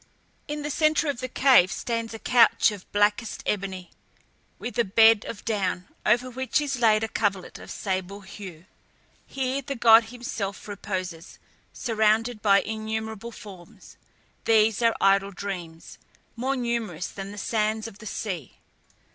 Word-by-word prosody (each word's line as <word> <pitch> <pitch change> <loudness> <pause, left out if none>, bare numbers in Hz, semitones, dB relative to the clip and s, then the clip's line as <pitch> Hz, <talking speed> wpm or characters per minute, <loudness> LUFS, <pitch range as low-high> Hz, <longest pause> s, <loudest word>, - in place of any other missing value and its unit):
In 295 0 -4
the 295 - -3
centre 310 +1 +2
of 275 - -2
the 255 - -3
cave 255 -8 +5
stands 230 -1 -3
a 225 - -6
couch 235 -1 +4
of 205 -3 -11
blackest 205 +2 +1
ebony, 190 -3 -3 0.7
with 240 -1 -5
a - - +5
bed 225 +1 +5
of 220 - -8
down, 190 -4 -1 0.2
over 245 +2 +3
which 260 +3 -1
is 275 -3 -2
laid 220 -2 +4
a - - 0
coverlet 200 -4 -2
of - - -12
sable 190 0 -4
hue. 190 -4 -10 0.6
Here 265 0 -2
the 275 +1 -5
god 230 -1 +7
himself 225 -5 -5
reposes, 185 -5 -5 0.3
surrounded 220 0 +1
by 200 -1 +5
innumerable 220 +1 -4
forms. 195 -7 -13 0.5
These 220 0 +3
are 230 -1 +3
idle 195 0 +3
dreams, 175 -5 -7 0.4
more 260 +4 -1
numerous 230 - -2
than 195 0 -7
the 205 - -10
sands 215 +1 -1
of 210 -3 -12
the 215 - -9
sea. 185 - -5
220 Hz, 145 wpm, -25 LUFS, 195-235 Hz, 0.7 s, god